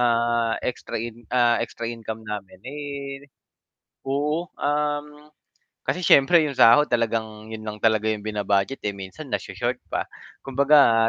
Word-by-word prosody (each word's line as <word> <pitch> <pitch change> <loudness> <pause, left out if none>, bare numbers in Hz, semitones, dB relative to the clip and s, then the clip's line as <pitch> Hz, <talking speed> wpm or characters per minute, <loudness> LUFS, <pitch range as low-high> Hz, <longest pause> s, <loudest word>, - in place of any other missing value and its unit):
ah, 120 -1 +2
extra 125 - -3
in 115 +1 -5
ah, 120 -2 +3
extra 115 0 -6
income 110 -1 -6
namin, 105 -3 -6
eh 140 0 -6 0.8
oo, 150 +5 0
um, 150 0 -2 0.6
kasi 180 - 0
siyempre 140 +5 +7
yung 140 - -4
sahod 145 +6 +7
talagang 110 -2 -1
yun 110 -1 -6
lang 105 0 -5
talaga 110 -1 +3
yung 105 -1 -3
bina-budget, 105 +3 0
eh, 100 - 0
minsan 95 -1 -8
nasho-short - - -2
pa. - - -1 0.4
Kumbaga, 135 -4 +5
120 Hz, 135 wpm, -24 LUFS, 110-140 Hz, 0.8 s, siyempre